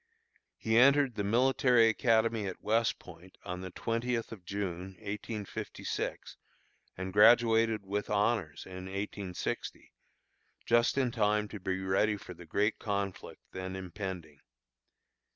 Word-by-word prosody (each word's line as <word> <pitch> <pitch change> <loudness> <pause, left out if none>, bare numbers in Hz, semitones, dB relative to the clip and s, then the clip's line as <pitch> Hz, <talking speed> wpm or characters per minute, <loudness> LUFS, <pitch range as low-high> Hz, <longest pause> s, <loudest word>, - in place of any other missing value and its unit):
He 110 +1 +2
entered 140 0 +5
the 105 - -2
Military 125 +1 +4
Academy 115 -2 +2
at 95 - -7
West 115 +2 +2
Point 90 +1 -14
on 90 +1 -5
the 95 - -6
twentieth 115 +4 -2
of 105 -5 -9
June, 95 -1 -4
1856, 105 0 -5 0.6
and 95 0 -5
graduated 115 0 +5
with 100 +1 -3
honors 105 +3 0
in 95 0 -8
1860, 100 -1 -5 0.7
just 120 +3 +3
in 130 -3 +2
time 105 -2 +1
to 105 - -7
be 95 0 -2
ready 100 +3 +1
for 90 - -10
the 85 -1 -13
great 105 +6 0
conflict 100 -3 -4
then 95 0 -5
impending. 90 -5 -6
105 Hz, 125 wpm, -31 LUFS, 95-115 Hz, 0.7 s, entered